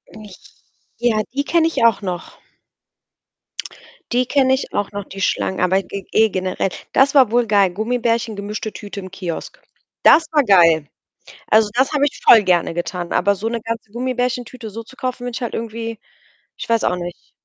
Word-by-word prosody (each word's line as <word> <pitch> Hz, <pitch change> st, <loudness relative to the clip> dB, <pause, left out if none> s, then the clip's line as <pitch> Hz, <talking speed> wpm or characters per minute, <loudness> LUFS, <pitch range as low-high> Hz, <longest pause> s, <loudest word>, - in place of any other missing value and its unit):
Nich 210 Hz, -4 st, -12 dB, 0.6 s
ja, 230 Hz, -3 st, +1 dB
die 280 Hz, +1 st, 0 dB
kenne 330 Hz, +1 st, +3 dB
ich 325 Hz, -, -1 dB
auch 225 Hz, -3 st, +3 dB
noch. 180 Hz, -3 st, -6 dB, 1.7 s
Die 250 Hz, +1 st, +2 dB
kenne 265 Hz, 0 st, +3 dB
ich 265 Hz, -, -6 dB
auch 205 Hz, -, -1 dB
noch, 205 Hz, -1 st, -5 dB
die 195 Hz, 0 st, -9 dB
Schlangen, 190 Hz, 0 st, 0 dB
aber 190 Hz, +2 st, +2 dB
g 200 Hz, +1 st, -6 dB
ge 220 Hz, 0 st, +4 dB
generell, 185 Hz, 0 st, -2 dB, 0.2 s
das 275 Hz, +1 st, +4 dB
war 260 Hz, -6 st, +5 dB
wohl 240 Hz, 0 st, +3 dB
geil. 200 Hz, -3 st, +3 dB
Gummibärchen, 230 Hz, +2 st, -1 dB
gemischte 210 Hz, +2 st, -5 dB
Tüte 205 Hz, -1 st, -8 dB
im 185 Hz, -, -10 dB
Kiosk. 180 Hz, -, -6 dB, 0.4 s
Das 325 Hz, -, +7 dB
war 295 Hz, -2 st, +3 dB
geil. 165 Hz, -, +4 dB, 0.6 s
Also, 215 Hz, 0 st, +4 dB
das 260 Hz, +4 st, +2 dB
habe 285 Hz, -1 st, +2 dB
ich 290 Hz, -, -5 dB
voll 225 Hz, -2 st, +8 dB
gerne 175 Hz, -3 st, +1 dB
getan, 175 Hz, 0 st, -4 dB
aber 200 Hz, +2 st, +2 dB
so 220 Hz, +4 st, -3 dB
'ne 235 Hz, 0 st, -3 dB
ganze 225 Hz, -1 st, -5 dB
Gummibärchen 250 Hz, 0 st, -1 dB
Tüte 230 Hz, -2 st, -9 dB
so 230 Hz, +3 st, -7 dB
zu 260 Hz, +3 st, -17 dB
kaufen, 255 Hz, -1 st, -4 dB
wenn 245 Hz, -, -4 dB
ich 255 Hz, -, -5 dB
halt 235 Hz, -, -3 dB
irgendwie 230 Hz, 0 st, -5 dB, 0.6 s
ich -, -, -7 dB
weiß 230 Hz, -1 st, +2 dB
auch 180 Hz, -, +1 dB
nicht. 175 Hz, 0 st, -8 dB
220 Hz, 185 wpm, -19 LUFS, 195-245 Hz, 1.7 s, voll